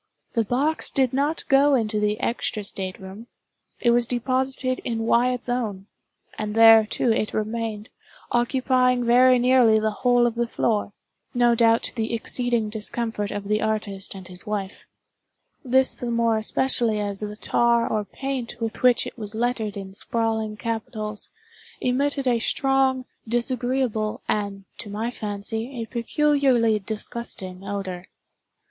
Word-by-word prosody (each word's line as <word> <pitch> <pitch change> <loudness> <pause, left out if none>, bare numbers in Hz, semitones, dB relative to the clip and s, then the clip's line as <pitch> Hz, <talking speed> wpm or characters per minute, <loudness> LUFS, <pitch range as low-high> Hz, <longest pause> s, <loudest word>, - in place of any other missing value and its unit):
The 230 - +2
box 275 +8 0
did 260 -3 +1
not 285 +4 -1
go 280 +1 +5
into 215 -3 0
the 210 +1 0
extra 230 -3 -2
state 190 -2 -2
room. 195 +4 -10 0.5
It 240 - +3
was 240 0 +3
deposited 255 +1 -1
in 225 -2 -3
Wyatt's 245 +2 +2
own; 220 -6 -2 0.5
and 210 0 -3
there, 225 -1 +8
too, 235 - 0
it 215 -1 -1
remained, 215 0 -3 0.4
occupying 250 0 +2
very 250 +2 +6
nearly 245 -3 +5
the 215 0 0
whole 245 +2 +3
of 240 - +1
the 235 0 -1
floor—no 235 +2 -1
doubt 230 0 +4
to - - -1
the 225 0 -1
exceeding 235 -1 -1
discomfort 220 -1 -3
of 205 - -4
the 210 +1 +1
artist 210 -3 -3
and 190 -2 -9
his 180 -1 -5
wife;—this 225 +5 -3
the 245 - -5
more 230 -1 +2
especially 230 -1 0
as 200 -1 -2
the 210 0 -5
tar 235 +1 +2
or 215 -1 -1
paint 260 +3 -5
with 225 -1 -4
which 250 -1 +4
it - - -9
was 210 0 -6
lettered 225 -3 -1
in 190 -1 -7
sprawling 220 0 -2
capitals, 215 -2 -4 0.5
emitted 275 +2 0
a 240 -2 +2
strong, 265 +1 +1 0.2
disagreeable, 240 -2 -1
and, 200 -2 -2
to 210 - -5
my 220 +4 -3
fancy, 220 +4 -4
a 225 - -3
peculiarly 245 -2 +2
disgusting 195 -3 -6
odor. 195 -2 -5
230 Hz, 140 wpm, -24 LUFS, 210-250 Hz, 0.5 s, there